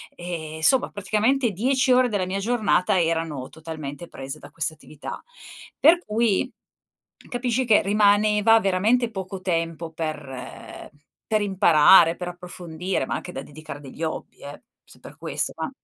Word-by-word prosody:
ehm, 160 -3 -6
somma, 260 +10 +4
praticamente 220 +5 +1
10 255 +7 +1
ore 250 0 +4
della 200 -4 -1
mia 190 +2 -3
giornata, 210 -4 +1
erano 165 -5 -1
totalmente 160 0 -8
prese 135 +1 -7
da - - -12
queste 160 -1 -2
attività. 155 -1 -9 0.6
Per 330 +4 +6
cui, 225 +3 0 0.8
capisci 245 0 -1
che 220 -3 +4
rimaneva 210 +2 +4
veramente 220 +5 +1
poco 190 -2 -6
tempo 165 -2 -2
per 150 -5 -7 0.4
per 215 -1 +1
imparare, 175 -3 +6
per 180 0 -5
approfondire, 175 -2 -4
ma - - -4
anche - - -6
da 135 - -5
dedicare 145 0 -10
a - - -15
degli 140 +2 -11
hobby, 160 - -5
eh, 145 +1 -9 0.2
se - - -17
è - - -35
per - - -13
questo, - - -2
ma - - -3
185 Hz, 150 wpm, -24 LUFS, 160-215 Hz, 0.8 s, Per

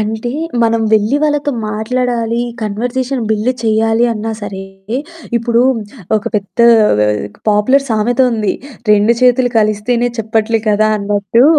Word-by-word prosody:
అంటే 220 +2 -3 0.3
మనం 230 0 +2
వెళ్లి 215 +5 +3
వాళ్ళతో 295 -1 +1 0.2
మాట్లాడాలి, 235 +1 -1 0.2
కన్వర్జేషన్ 245 +5 -2
బిల్డ్ 220 +3 +1
చేయాలి 225 +1 +2
అన్నా 220 +1 -4
సరే 195 -2 -6 0.8
ఇప్పుడు 235 0 +1 0.6
ఒక 210 - -3
పెద్ద 200 +1 -3 0.3
ఆహ్, 105 0 +1 0.2
పాపులర్ 255 +7 +3
సామెత 230 +3 0
ఉంది. 215 -3 0 0.4
రెండు 210 +3 +4
చేతులు 250 0 +3
కలిస్తేనే 215 +3 +1
చెప్పట్లేదు 220 0 0
కదా! 215 +1 +3
అన్నట్టు, 205 +3 +1
225 Hz, 120 wpm, -14 LUFS, 210-245 Hz, 0.8 s, రెండు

